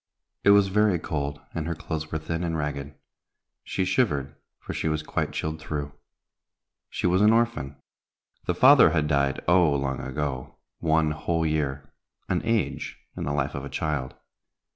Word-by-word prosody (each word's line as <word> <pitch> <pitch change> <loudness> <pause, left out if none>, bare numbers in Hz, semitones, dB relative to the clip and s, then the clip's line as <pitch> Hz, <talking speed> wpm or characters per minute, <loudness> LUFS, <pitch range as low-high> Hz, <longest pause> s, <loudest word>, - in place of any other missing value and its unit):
It - - +5
was 100 -1 +6
very 105 -1 +3
cold, 70 -3 -3
and 80 0 -3
her 85 - -2
clothes 80 0 -5
were 80 - 0
thin 80 +2 -3
and 80 -2 -1
ragged. 75 -1 -4 0.7
She 95 - -1
shivered, 80 - +1 0.3
for - - -6
she - - -2
was 75 0 -1
quite - - -2
chilled 80 0 -3
through. 75 -2 -4 1.0
She - - -3
was 90 +2 +3
an 105 +1 +6
orphan. 115 -12 +1 0.7
The 90 - +1
father 130 0 +8
had 80 -2 +1
died, 70 -2 +1
oh! 85 -2 +5
long 70 -1 -1
ago, 65 -1 -4 0.2
one 80 -1 +2
whole 80 +1 -1
year, 70 -3 -2 0.3
an - - 0
age 115 -3 -1 0.2
in - - -4
the 70 - -1
life 70 -1 -1
of 70 - -5
a 70 - -6
child. 75 -5 -2
80 Hz, 165 wpm, -26 LUFS, 70-90 Hz, 1.0 s, father